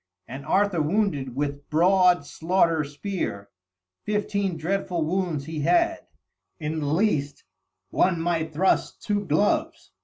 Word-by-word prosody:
And 135 Hz, +2 st, -8 dB
Arthur 195 Hz, -3 st, +2 dB
wounded 150 Hz, -, 0 dB
with 145 Hz, 0 st, -3 dB
broad 180 Hz, 0 st, +4 dB
slaughter 165 Hz, 0 st, +1 dB
spear; 145 Hz, -, -4 dB, 0.5 s
fifteen 200 Hz, -3 st, -1 dB
dreadful 175 Hz, 0 st, -1 dB
wounds 170 Hz, -4 st, -1 dB
he 160 Hz, 0 st, -5 dB
had; 335 Hz, -, +1 dB, 0.5 s
in 155 Hz, 0 st, -3 dB
the 145 Hz, -, -2 dB
least 150 Hz, -4 st, 0 dB, 0.5 s
one 175 Hz, -2 st, +2 dB
might 165 Hz, -1 st, -1 dB
thrust 180 Hz, +5 st, 0 dB
two 205 Hz, -1 st, 0 dB
gloves! 195 Hz, +3 st, 0 dB
165 Hz, 120 wpm, -25 LUFS, 150-195 Hz, 0.5 s, broad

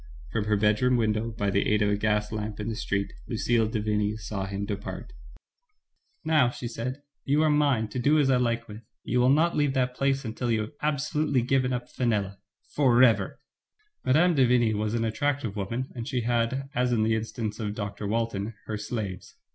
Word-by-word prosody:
From 110 Hz, -2 st, -1 dB
her 105 Hz, -1 st, +2 dB
bedroom 110 Hz, +5 st, +3 dB
window, 110 Hz, 0 st, 0 dB
by 105 Hz, -3 st, -2 dB
the 100 Hz, -, +1 dB
aid 105 Hz, 0 st, +3 dB
of 105 Hz, -, +2 dB
a -, -, +3 dB
gas 105 Hz, 0 st, 0 dB
lamp 105 Hz, -1 st, -4 dB
in 105 Hz, +2 st, -3 dB
the 110 Hz, -, -3 dB
street, 100 Hz, -2 st, -2 dB
Lucille 115 Hz, -1 st, +1 dB
de 110 Hz, 0 st, -2 dB
Vigny 105 Hz, 0 st, 0 dB
saw 100 Hz, -2 st, -4 dB
him 100 Hz, +1 st, -3 dB
depart. 100 Hz, -1 st, -6 dB, 1.1 s
"Now," 155 Hz, -6 st, +4 dB
she 120 Hz, 0 st, -6 dB
said, 125 Hz, +5 st, -5 dB, 0.2 s
"you 145 Hz, +3 st, +2 dB
are 155 Hz, -, +3 dB
mine, 140 Hz, -7 st, +2 dB
to 115 Hz, -, -4 dB
do 145 Hz, +5 st, +3 dB
as 140 Hz, -3 st, +3 dB
I 125 Hz, -, +3 dB
Hke 115 Hz, -1 st, 0 dB
with. 105 Hz, +1 st, -9 dB, 0.2 s
You 125 Hz, -, 0 dB
will 125 Hz, +1 st, +4 dB
not 160 Hz, +5 st, +3 dB
leave 145 Hz, -2 st, +1 dB
that 125 Hz, -1 st, +1 dB
place 135 Hz, +1 st, 0 dB
until 120 Hz, +2 st, -3 dB
you 110 Hz, -2 st, +2 dB
have 110 Hz, -, -5 dB
absolutely 150 Hz, -2 st, 0 dB
given 130 Hz, 0 st, +1 dB
up 125 Hz, -1 st, -3 dB
Fenella 100 Hz, -5 st, -1 dB, 0.2 s
— -, -, -29 dB
forever/' 120 Hz, -7 st, +4 dB, 0.7 s
Mme. 165 Hz, +7 st, +4 dB
de 135 Hz, -5 st, +4 dB
Vigny 120 Hz, -2 st, +3 dB
was 105 Hz, +1 st, -1 dB
an 115 Hz, -1 st, 0 dB
attractive 130 Hz, -1 st, -1 dB
woman, 115 Hz, +6 st, -3 dB
and 120 Hz, -2 st, -6 dB
she 125 Hz, -3 st, -1 dB
had, 120 Hz, +3 st, 0 dB
as 125 Hz, 0 st, +1 dB
in 115 Hz, -3 st, +2 dB
the 110 Hz, +1 st, +2 dB
instance 110 Hz, -1 st, -3 dB
of 105 Hz, -2 st, -3 dB
Dr. 100 Hz, -1 st, -4 dB
Walton, 110 Hz, -1 st, -2 dB
her 105 Hz, -1 st, -4 dB
slaves. 105 Hz, -4 st, -5 dB
115 Hz, 205 wpm, -27 LUFS, 105-130 Hz, 1.1 s, Now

